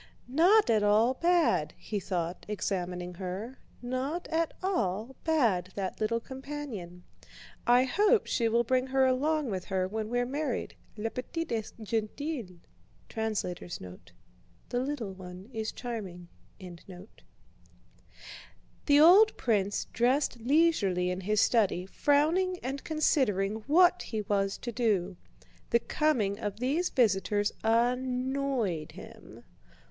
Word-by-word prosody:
"Not 345 - +4
at 215 -2 +3
all 215 +4 +4
bad!" 335 - +2
he 210 - -4
thought, 175 -2 -4
examining 180 -2 -3
her, 190 +8 -6 0.2
"not 265 +8 -3
at 325 0 0
all 235 - -1
bad, 230 - +2
that 195 0 -4
little 230 +2 +1
companion! 260 -10 -7 0.6
I 245 +1 +6
hope 410 - +3
she 230 -2 0
will 235 +1 +2
bring 255 +2 +1
her 265 0 +3
along 280 +1 +1
with 185 -2 -4
her 185 -1 -1
when 215 +2 -4
we're 245 +1 0
married, 275 0 -3 0.2
la 225 +2 -3
petite 330 +6 -5
est 225 0 -4
gentille." 225 - -3 0.6
The 180 - -4 0.7
little 255 -7 -3
one 185 +4 -11
is 220 -1 -3
charming. 195 -8 -7 0.3
The 180 0 -11 1.9
old 390 +8 +7
prince 205 -4 0
dressed 250 +1 +1
leisurely 225 - +2
in 180 +1 -4
his 210 +2 +1
study, 200 -6 +2
frowning 315 - +2
and 270 +2 -4
considering 220 -10 +1
what 355 +4 +5
he 220 -2 -4
was 195 -1 0
to 240 - -5
do. 200 -6 0 0.5
The 235 - +4
coming 230 -10 0
of 205 -1 -4
these 290 +9 0
visitors 205 -3 +1
annoyed 250 - 0
him. - - -13
230 Hz, 120 wpm, -29 LUFS, 195-275 Hz, 1.9 s, old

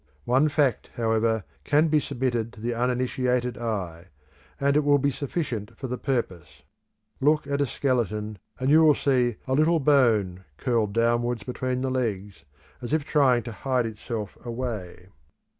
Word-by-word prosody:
One 135 +5 +3
fact, 145 -6 +1
however, 115 -2 +1 0.2
can 150 - +3
be 155 -1 +3
submitted 120 -4 -2
to - - -14
the 120 +2 -2
uninitiated 125 0 0
eye, 95 -7 -4 0.5
and 140 0 +2
it - - +5
will 145 0 +4
be 140 +1 +1
sufficient 125 - -4
for - - -6
the 125 0 -4
purpose. 115 - -3 0.6
Look 150 +2 +2
at 140 0 -1
a 140 - +2
skeleton 110 -6 -1 0.2
and 130 +2 +1
you 160 +1 +7
will 150 -2 +6
see 125 -5 +1
a 130 - -1
little 160 +4 +3
bone 115 -11 +2
curled 115 -5 0
downwards 120 +1 +1
between 125 0 -3
the 130 0 -1
legs, 100 - -3 0.4
as 120 +4 -4
if 155 -2 +1
trying 130 -6 +3
to 115 - -6
hide 125 +3 -1
itself 110 -1 -6
away. 115 -7 -5
125 Hz, 160 wpm, -26 LUFS, 110-135 Hz, 0.6 s, you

